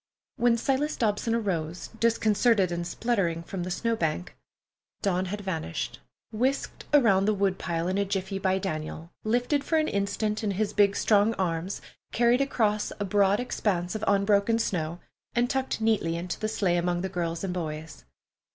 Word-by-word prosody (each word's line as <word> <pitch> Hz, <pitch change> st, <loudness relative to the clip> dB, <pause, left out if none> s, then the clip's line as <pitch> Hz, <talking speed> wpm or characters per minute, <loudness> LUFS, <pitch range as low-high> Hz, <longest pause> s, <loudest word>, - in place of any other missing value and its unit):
When 240 Hz, -1 st, +3 dB
Silas 275 Hz, +5 st, 0 dB
Dobson 225 Hz, +1 st, 0 dB
arose, 180 Hz, -6 st, -2 dB
disconcerted 220 Hz, -3 st, +3 dB
and 170 Hz, 0 st, -2 dB
spluttering, 180 Hz, -6 st, 0 dB
from 185 Hz, +2 st, -5 dB
the 180 Hz, -, -3 dB
snow 230 Hz, +5 st, 0 dB
bank, 155 Hz, -, -2 dB, 0.7 s
Dawn 185 Hz, -1 st, +1 dB
had 205 Hz, +3 st, -4 dB
vanished, 165 Hz, -, -4 dB, 0.3 s
whisked 255 Hz, +5 st, -1 dB
around 225 Hz, -10 st, +5 dB
the 215 Hz, 0 st, +2 dB
wood 195 Hz, -1 st, 0 dB
pile 170 Hz, -1 st, -2 dB
in 190 Hz, +2 st, 0 dB
a -, -, +3 dB
jiffy 195 Hz, 0 st, -2 dB
by 190 Hz, 0 st, +1 dB
Daniel, 165 Hz, -2 st, -4 dB
lifted 245 Hz, +6 st, +1 dB
for 320 Hz, -, +1 dB
an 310 Hz, 0 st, +2 dB
instant 210 Hz, +2 st, -1 dB
in 210 Hz, -, 0 dB
his 210 Hz, -1 st, 0 dB, 0.2 s
strong 210 Hz, +2 st, +3 dB
arms, 180 Hz, 0 st, -2 dB, 0.3 s
carried 240 Hz, +2 st, +3 dB
across 215 Hz, -6 st, +1 dB
a 205 Hz, -, -1 dB
broad 200 Hz, +1 st, +3 dB
expanse 185 Hz, -7 st, -1 dB
of 215 Hz, -1 st, -4 dB
unbroken 200 Hz, +2 st, +3 dB
snow, 175 Hz, -6 st, -2 dB, 0.4 s
and 245 Hz, +1 st, +2 dB
tucked 265 Hz, -3 st, -1 dB
neatly 220 Hz, -7 st, +1 dB
into 175 Hz, +1 st, -4 dB
the 215 Hz, -, -1 dB
sleigh 190 Hz, -5 st, +1 dB
among 175 Hz, 0 st, 0 dB
the 190 Hz, -, -1 dB
girls 170 Hz, -2 st, -3 dB
and 190 Hz, -2 st, -2 dB
boys. 160 Hz, -3 st, -5 dB
200 Hz, 165 wpm, -27 LUFS, 175-225 Hz, 0.7 s, around